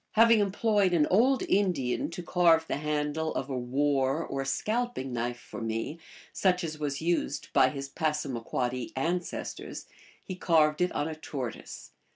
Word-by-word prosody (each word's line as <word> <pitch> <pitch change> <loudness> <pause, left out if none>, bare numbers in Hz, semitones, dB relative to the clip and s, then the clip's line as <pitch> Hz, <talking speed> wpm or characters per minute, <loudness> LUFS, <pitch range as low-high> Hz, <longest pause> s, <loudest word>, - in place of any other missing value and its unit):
Having 230 0 +6
employed 205 -1 +2
an 155 -4 +4
old 250 +7 +4
Indian 175 -11 +1
to 175 +1 -7
carve 165 -2 +4
the - - -1
handle 150 +1 -1
of 135 - -3
a - - -1
war 135 +3 0
/or 135 0 -2
scalping 215 - -1
knife 120 0 -2
for - - -9
me, 115 +8 -3 0.3
such 180 -2 +2
as 155 -2 -4
was 145 0 -3
used 165 -4 -1
by 130 - +5
his 140 +1 -5
Passamaquoddy 130 -4 -2
ancestors, 170 +6 -3 0.4
he 185 - -6
carved 160 -3 +3
on 145 - -1
it - - -4
a - - -6
tortoise. 130 -6 -6
155 Hz, 155 wpm, -29 LUFS, 135-180 Hz, 0.4 s, Having